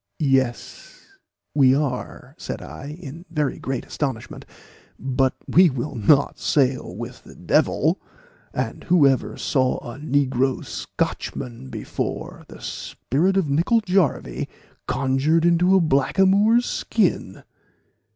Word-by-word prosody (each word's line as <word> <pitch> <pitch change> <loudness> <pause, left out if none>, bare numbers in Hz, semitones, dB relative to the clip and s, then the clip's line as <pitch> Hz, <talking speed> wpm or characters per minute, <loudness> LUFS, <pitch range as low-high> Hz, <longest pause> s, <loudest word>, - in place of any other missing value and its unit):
"Yes, 135 -5 -1 0.5
we 135 -3 +5
are," 140 -3 -3
said - - -5
I, 80 - -9
in 155 +1 -9
very 150 -5 -1
great 130 -1 -3
astonishment, 135 -6 -4 0.5
"but 130 0 0
we 180 0 +6
will 130 +1 -4
not 135 +6 +3
sail 130 -3 +1
with - - -8
the - - -14
devil; - - +1 0.5
and - - -4
who 170 -5 +5
ever 135 -2 +1
saw 130 -3 +1
a 120 +3 -8
negro 135 -3 0
Scotchman 115 - -4
before, - - -5
the - - -13
spirit 180 +9 -1
of 190 -5 +2
Nicol 170 +11 +2
Jarvie 180 - 0 0.4
conjured 135 +5 +1
into 175 +2 +4
a - - +6
blackamoor's 195 - +3
skin!" 180 - -1
140 Hz, 115 wpm, -23 LUFS, 130-170 Hz, 0.5 s, we